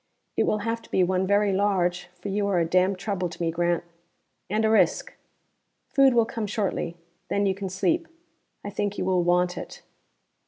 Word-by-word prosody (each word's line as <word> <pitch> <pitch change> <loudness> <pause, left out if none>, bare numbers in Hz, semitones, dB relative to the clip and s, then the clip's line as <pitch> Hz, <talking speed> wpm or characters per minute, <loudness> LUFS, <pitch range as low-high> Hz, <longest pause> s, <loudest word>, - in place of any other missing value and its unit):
It - - +2
will 215 - +2
have 230 0 -1
to - - -18
be 185 - +2
one 185 +1 +1
very 200 0 +3
large, 185 -3 +1
for 200 - -5
you 200 +1 0
are 195 -3 +1
a 170 - +2
damn 185 +3 +2
trouble 185 -2 -2
to 165 - -11
me, 165 -1 0
Grant. 175 +1 0 0.7
And 215 +3 +1
a - - +3
risk. 220 - +2 0.8
Food 270 -2 +4
will 230 -1 +5
come 225 -2 -4
shortly. 200 -5 -2 0.3
Then 200 0 +1
you 195 - +2
can 195 0 -5
sleep: 325 - 0 0.6
I 205 - -5
think 205 0 -2
you - - -1
will 185 -1 +2
want 180 0 +1
it." - - -9
195 Hz, 195 wpm, -26 LUFS, 180-205 Hz, 0.8 s, will